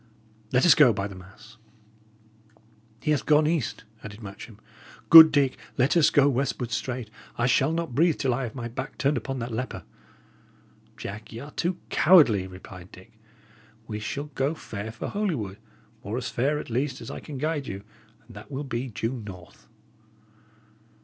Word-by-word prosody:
Let 125 +4 +3
us 175 - +8
go, 150 -6 +6
by 100 0 -3
the 100 - -10
mass!" 95 +5 -15 1.5
"He 150 - +1
hath 150 - +1
gone 150 0 +5
east," 155 -9 -1 0.2
added 110 +1 -10
Matcham. 100 +2 -10 0.5
"Good 160 -1 +12
Dick, 140 -3 +1 0.2
let 130 +5 +2
us 165 -3 +5
go 145 -1 +4
westward 130 -2 -1
straight; 120 -1 -4 0.3
I 120 - +1
shall 135 +4 +3
not 165 -5 -3
breathe 160 +4 +3
till 130 -2 0
I 130 - -2
have 120 -2 -5
my 120 -3 -5
back 120 - -7
turned 140 +2 +1
upon 135 0 -4
that 120 -1 -5
leper." 125 +3 -4 1.1
"Jack, 110 +2 -8
y' 110 - -8
are 145 +2 -10
too 175 +4 -2
cowardly," 130 - +5
replied 95 -1 -12
Dick. 95 - -15 0.7
"We 105 -2 -5
shall 145 +7 -5
go 135 +5 -1
fair 110 -7 -7
for 115 - -6
Holywood, 135 - -3 0.4
or 105 +5 -4
as 125 - -3
fair, 140 +5 0
at 135 - -7
least, 130 +2 -1
as - - -7
I - - -6
can 145 -3 -8
guide 150 0 -2
you, 95 +1 -6 0.4
and 115 - -15
that 105 - -11
will 140 0 -4
be 130 -2 -4
due 115 +1 -3
north." 90 -4 -12
125 Hz, 175 wpm, -26 LUFS, 110-150 Hz, 1.5 s, Good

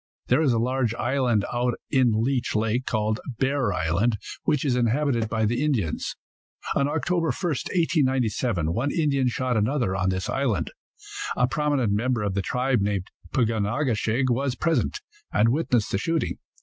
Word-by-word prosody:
There 130 +5 +4
is 145 -5 +3
a 115 - +2
large 120 -1 0
island 120 -5 +1
out 120 0 0 0.2
in 120 -5 +3
Leech 130 -2 0
lake, 115 +4 0
called 110 -1 0 0.2
Bear 135 -4 +1
island, 95 +7 +1 0.3
which 150 -1 +1
is 130 -3 +2
inhabited 120 -1 +1
by 110 -1 0
the 120 +6 0
Indians. 115 - -1 0.6
On 140 - +2
Oct. 150 +4 -2
1, 175 -1 +2
1897, 130 - 0
one 125 +8 0
Indian 140 -4 +1
shot 125 0 -1
another 110 -2 +1
on 95 0 +1
this 95 0 -2
island. 115 -11 -1 0.7
A 125 - +3
prominent 145 -6 0
member 120 +1 0
of 100 -2 -1
the 100 - 0
tribe 125 +4 0
named 100 -2 -1 0.2
Pug 115 -3 +2
on 105 -3 0
a 115 +8 -1
ke 120 -4 +1
shig 120 +4 0
was 130 +1 0
present, 165 - 0 0.3
and 115 - +3
witnessed 125 -5 +1
the 95 - 0
shooting. 165 +6 -1
125 Hz, 170 wpm, -25 LUFS, 110-140 Hz, 0.7 s, There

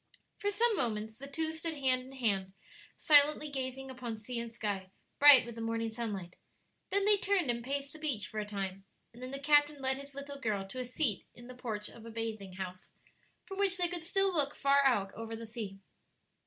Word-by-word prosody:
For 405 - 0
some 450 +2 +2
moments 220 - -1
the 275 - -7
two 315 +3 -1
stood 320 0 -4
hand 260 -3 +2
in 260 +1 -12
hand 200 -7 0 0.4
silently 300 0 +5
gazing 265 0 -4
upon 245 -3 -5
sea 235 +3 -4
and 235 0 -5
sky, 205 -4 -3 0.3
bright 285 -4 +9
with 235 - -7
the 230 - -7
morning 225 0 -1
sunlight; 205 -6 -5 0.5
then 400 0 +2
they 415 0 +5
turned 385 -9 +2
and 235 0 -4
paced 280 +2 -3
the 310 - -11
beach 270 -10 0
for 215 - -5
a 210 - -2
time, 195 -2 -4 0.3
and 240 - -13
then 255 - -5
the 275 - -4
captain 290 +1 +4
led 265 0 +1
his 280 0 -10
little 280 0 -6
girl 210 -5 -1
to 255 - -5
a 250 - -2
seat 250 -3 -1
in 240 - -12
the 255 - -9
porch 220 -4 -4
of 230 - -12
a 230 - -8
bathing 220 -4 -4
house, 185 -1 -7 0.6
from 390 -1 -7
which 390 -2 +2
they 355 -1 +3
could 350 0 -3
still 390 +3 +1
look 290 -3 +1
far 280 0 +4
out 205 -7 +3
over 225 +1 -6
the 230 +1 -7
sea. 220 -4 -6
255 Hz, 215 wpm, -33 LUFS, 220-290 Hz, 0.6 s, bright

